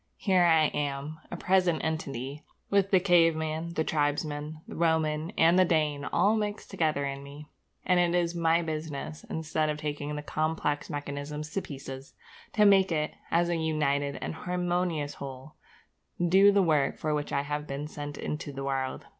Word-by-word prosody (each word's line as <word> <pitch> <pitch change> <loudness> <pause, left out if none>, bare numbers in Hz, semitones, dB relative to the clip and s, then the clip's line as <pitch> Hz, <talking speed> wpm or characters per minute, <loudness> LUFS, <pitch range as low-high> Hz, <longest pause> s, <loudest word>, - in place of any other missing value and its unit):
Here 185 -3 +3
I 160 -2 +5
am, 145 +2 -3
a 175 - -5
present 180 -2 +2
entity, 145 -2 -3 0.3
with 200 -1 +3
the 190 - +5
caveman, 165 -2 +2
the 160 - +1
tribesman, 150 0 -1
the - - -8
Roman, 160 -1 +1
and 170 +3 +5
the - - +7
Dane 150 -4 +1
all 210 +2 +3
mixed 210 -1 -3
up - - -14
together 155 -6 0
in 140 0 -4
me; 145 +2 -11 0.4
and 180 -1 +3
it 175 0 +2
is 170 -1 0
my 165 0 +2
business, 155 -1 -5
instead 155 -1 -1
of 150 - -1
taking 150 -1 -4
the 150 - -5
complex 155 -1 -1
mechanism 145 +1 -4
to 155 +6 -3
pieces, 135 -2 -9 0.4
to 210 -2 +4
make 195 -2 +5
it, 155 -1 0 0.2
as 170 +1 +2
a 170 -1 0
united 145 -3 0
and - - -3
harmonious 175 -3 -1
whole, 135 +1 -9 0.6
do 190 +4 +5
the 200 -1 +4
work 150 -5 +2
for 155 -2 -1
which 150 -1 -2
I 140 - 0
have 150 +1 -3
been 140 +2 -4
sent 145 -1 -7
into 150 -1 -4
the 135 0 -6
world. 135 -1 -2
155 Hz, 175 wpm, -29 LUFS, 145-170 Hz, 0.6 s, the